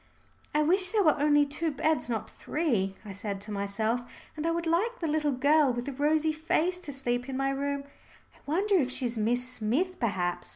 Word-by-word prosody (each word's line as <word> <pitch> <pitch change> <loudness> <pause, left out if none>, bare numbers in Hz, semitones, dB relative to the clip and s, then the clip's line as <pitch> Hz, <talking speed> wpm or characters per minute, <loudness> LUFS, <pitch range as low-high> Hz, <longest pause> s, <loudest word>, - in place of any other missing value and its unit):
"I 300 0 +2
wish 370 +4 +4
there 425 -1 +2
were 310 -3 +3
only 295 0 +4
two 310 +3 -1
beds, 310 -1 0
not 225 -2 -2
three," 225 - -1
I 200 - -7
said 200 0 -4
to 210 +1 -7
myself. 210 +4 -1 0.3
"And 310 +1 -2
I - - +3
would 335 0 -1
like 390 +9 +1
the 330 - -2
little 300 -1 +1
girl 285 +2 +4
with 240 0 -4
the 280 - -4
rosy 310 +3 +2
face 325 +3 0
to 320 -5 -6
sleep 250 -1 -2
in 260 - -3
my 270 0 +1
room. 280 +1 -2 0.5
I - - -23
wonder 390 +6 +2
if 265 -7 +1
she's 250 -2 -1
Miss 245 +3 +1
Smith 255 - -1
perhaps. 180 - -1
285 Hz, 205 wpm, -29 LUFS, 240-315 Hz, 0.5 s, wish